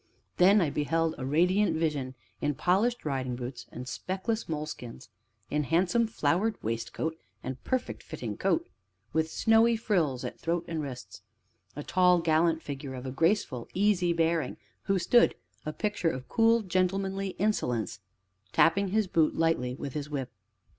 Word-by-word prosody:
Then 195 +3 +6
I 155 -5 +1
beheld 165 +3 0
a 130 - -3
radiant 180 +8 +3
vision 145 -5 -1 0.3
in 145 -1 0
polished 205 - +1
riding 130 -4 -2
boots 120 -1 -7
and 125 +1 -7
speckless 190 - -3
moleskins, 150 - -6 0.4
in 150 0 0
handsome 180 - +2
flowered 210 +2 0
waistcoat 115 +8 -2 0.3
and 130 0 -6
perfect 255 -1 -2
fitting - - -6
coat, 335 - 0 0.5
with 160 0 +1
snowy 225 +5 +4
frills 165 - 0
at - - -6
throat 170 +1 -1
and 165 -2 -2
wrists; 130 -4 -8 0.5
a 145 - -5
tall, 180 +1 +4
gallant 165 0 +2
figure, 140 -1 -6
of 125 0 -7
a 130 - -3
graceful, 160 - 0
easy 190 -3 +3
bearing, 165 -4 0 0.3
who 195 - +2
stood, 215 +7 +4 0.3
a - - 0
picture 205 -1 -1
of 130 -4 -5
cool, 230 0 +3
gentlemanly 190 +1 -1
insolence, 125 - 0 0.5
tapping 195 - +4
his 215 +3 +1
boot 165 -4 +2
lightly 160 -7 +1
with 140 -1 -6
his 150 -1 -4
whip. 135 -4 -4
165 Hz, 150 wpm, -29 LUFS, 140-195 Hz, 0.5 s, Then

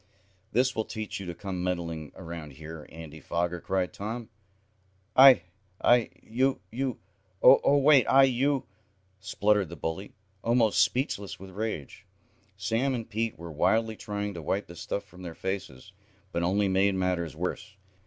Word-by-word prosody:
"That 130 +3 +2
will 110 - 0
teach 110 -2 -5
you 95 - -7
to 85 - -5
come 90 0 -4
meddling 85 -5 -3
around 85 -4 -8
here. 80 +2 -9
Andy 80 -1 -10
Foger!" 85 +2 -2
cried 95 -1 -1
Tom. 110 +3 -5 0.9
"I 130 -1 +9 0.4
I 120 -1 +4
you 130 +4 +1
you 130 +1 -2 0.5
Oh, 140 +2 +7
wait 140 -2 +5
I 135 0 +6
you 135 +1 +2 0.3
" 95 0 -40
spluttered 105 -3 +2
the 85 - -7
bully, 80 +5 -5 0.3
almost 115 -2 +3
speechless 110 -6 -1
with 95 0 -10
rage. 100 - -5 0.5
Sam 115 +7 0
and 115 -2 -5
Pete 115 -2 -2
were 85 0 -8
wildly 110 +8 +1
trying 105 -1 -4
to 85 - -7
wipe 95 +6 -1
the 85 - -12
stuff 100 - -4
from 95 -2 -15
their 85 -3 -7
faces, 95 -4 -5 0.4
but 85 - -1
only 100 +4 +2
made 95 +1 +2
matters 90 -4 -1
worse. 95 +5 -4
100 Hz, 155 wpm, -28 LUFS, 85-115 Hz, 0.9 s, I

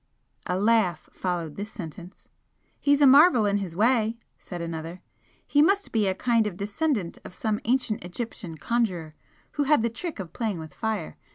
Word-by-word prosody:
A 180 - 0
laugh 205 -5 +2
followed 175 -4 -3
this 205 +2 -5
sentence. 175 0 -10 0.5
"He's 285 0 +3
a - - +8
marvel 275 -3 +7
in 205 0 +2
his 180 -4 -5
way," 225 +1 +2 0.2
said 175 - -7
another 165 +1 -6 0.4
"He 290 - +3
must 395 +6 +2
be 215 -3 +2
a 190 - 0
kind 230 0 +2
of 185 -4 -6
descendant 205 - -1
of 180 - -10
some 215 0 -1
ancient 235 -4 0
Egyptian 180 -2 -6
conjurer 185 -8 -1 0.4
who 290 - -1
had 295 -5 +4
the 235 - 0
trick 325 - -5
of 175 -4 -7
playing 220 -6 -2
with 160 -1 -9
fire. 220 -7 -3
210 Hz, 175 wpm, -26 LUFS, 180-240 Hz, 0.5 s, a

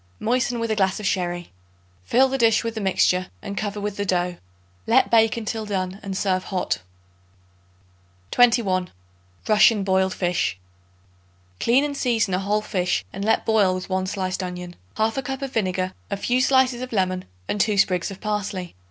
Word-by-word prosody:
Moisten 245 +1 0
with 230 -1 -1
a - - +1
glass 190 -1 +1
of 210 - -6
sherry. 175 -3 -1 0.5
Fill 260 - +4
the 270 +1 -2
dish 225 -1 +4
with 230 -1 -3
the 220 - -4
mixture 185 -1 +2 0.2
and 200 -1 -5
cover 205 0 -3
with 205 0 -4
the 205 - -1
dough. 180 -2 0 0.5
Let 240 +4 +4
bake 225 0 +4
until 220 0 -3
done 190 -2 -3
and 195 -1 -4
serve 185 -2 0
hot. 185 -2 -1 1.5
21. 215 -7 +3 0.6
Russian 215 -1 +5
Boiled 190 -1 +1
Fish. 175 - 0 1.0
Clean 250 +4 +3
and 290 -1 -2
season 230 -7 +1
a 180 - +1
whole 205 +2 0
fish 180 -3 -1
and 195 - -5
let 220 - +2
boil 205 -4 +3
with 185 +1 -6
1 185 0 0
sliced 185 -1 -2
onion, 180 -1 -6 0.2
1/2 220 +4 0
cup 270 +2 -4
of 270 - -5
vinegar, 185 -3 -1 0.2
a 200 - -2
few 245 +5 +1
slices 260 -1 +3
of 255 - -6
lemon 185 -3 0 0.2
and 205 - 0
2 210 0 +1
sprigs 185 -3 +2
of 195 -1 -9
parsley. 205 -4 -3
200 Hz, 175 wpm, -23 LUFS, 185-225 Hz, 1.5 s, Russian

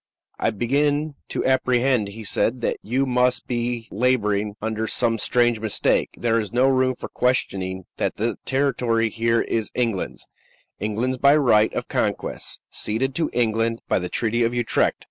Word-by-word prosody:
"I - - +2
begin 145 +7 0 0.2
to - - -2
apprehend," 130 -3 +2
he 110 +3 -9
said, 120 +4 0
"that - - 0
you 130 +6 0
must 125 -1 +1
be 120 -1 -2
la 125 +5 +3
boring 105 -1 -1
under 110 0 -2
some 115 -1 0
strange 120 +1 +2
mistake. 110 -1 +1
There 115 -1 +1
is 105 -3 -4
no 125 +3 +3
room 130 -1 +2
for - - -7
questioning 95 -7 -1
that - - -1
the 115 +3 -1
territory 125 -5 +1
here 115 0 +1
is 110 -2 -2
England's 115 -6 -2 0.5
England's 115 +5 -1
by 140 +2 +6
right 110 -7 +4
of - - -3
conquest; - - -2
ceded 130 +5 -2
to 160 +3 0
England 115 -1 0
by - - +2
the 90 0 -4
Treaty 120 +3 0
of 120 +1 +1
Utrecht. 120 -2 +1
120 Hz, 165 wpm, -23 LUFS, 110-130 Hz, 0.5 s, by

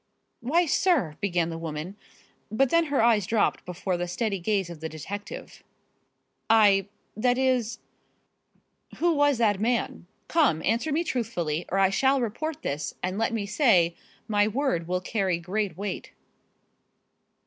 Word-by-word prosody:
"Why, 320 +9 +2
sir 300 - +2
" - - -41
began 175 -4 0
the 165 - -5
woman, 165 +3 -5 0.5
but 250 +5 +1
then 335 0 +4
her 285 -6 +1
eyes 220 -5 +3
dropped 220 0 +1
before 180 +1 -3
the 175 0 -3
steady 200 +2 -2
gaze 195 0 0
of 170 -2 -9
the 160 +1 -5
detective. 195 +7 -8 0.9
"I 205 -3 +5 0.3
that 245 +3 +1
is 250 -4 +1 0.6
" - - -24
"Who 345 +1 +2
was 290 -3 +3
that 210 -4 +2
man? 230 -5 -1 0.2
Come, 280 - +2
answer 235 +9 0
me 320 +4 +1
truthfully, 175 - -2
or 195 - -1
I 195 -1 +4
shall 265 +7 +3
report 265 +7 -3
this, 145 +1 -3
and 185 +3 -2
let 225 - +1
me 220 -3 -2
say, 200 - +3 0.3
my 205 -2 +2
word 215 - -1
will 180 +1 -1
carry 190 -3 0
great 190 +4 -3
weight." 200 -1 -5
205 Hz, 155 wpm, -26 LUFS, 180-250 Hz, 0.9 s, I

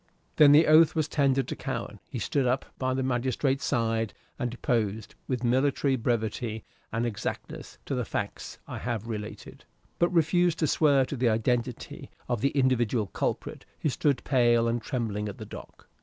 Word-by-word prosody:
Then 150 -2 +8
the 155 +3 +7
oath 155 +2 +6
was 155 -2 +1
tendered 135 -3 +1
to - - -3
Cowen: - - -5
he - - -5
stood 135 -3 0
up 130 +2 0
by 130 0 0
the 130 - -1
magistrate's 130 +2 0
side 115 -2 0 0.2
and 125 -3 -1
deposed, 110 -3 -2
with 125 -2 -2
military 135 +2 +2
brevity 110 -2 -2 0.3
and 115 +1 -1
exactness, 110 -4 -5
to - - -3
the - - 0
facts - - -5
I - - -6
have 115 -3 -3
related, 105 -2 -7 0.4
but 175 - +4
refused 175 0 +2
to 160 - +1
swear 145 -3 +3
to 140 - -5
the 125 -2 +2
identity 120 +2 -2 0.2
of 120 -3 -1
the 140 - +3
individual 125 -5 +1
culprit - - -3 0.2
who 155 - +1
stood 140 +2 0
pale 120 -3 +3
and 115 0 0
trembling 110 -5 -2
at 100 - -8
the 110 - -7
dock. - - -11
125 Hz, 170 wpm, -28 LUFS, 115-140 Hz, 0.4 s, Then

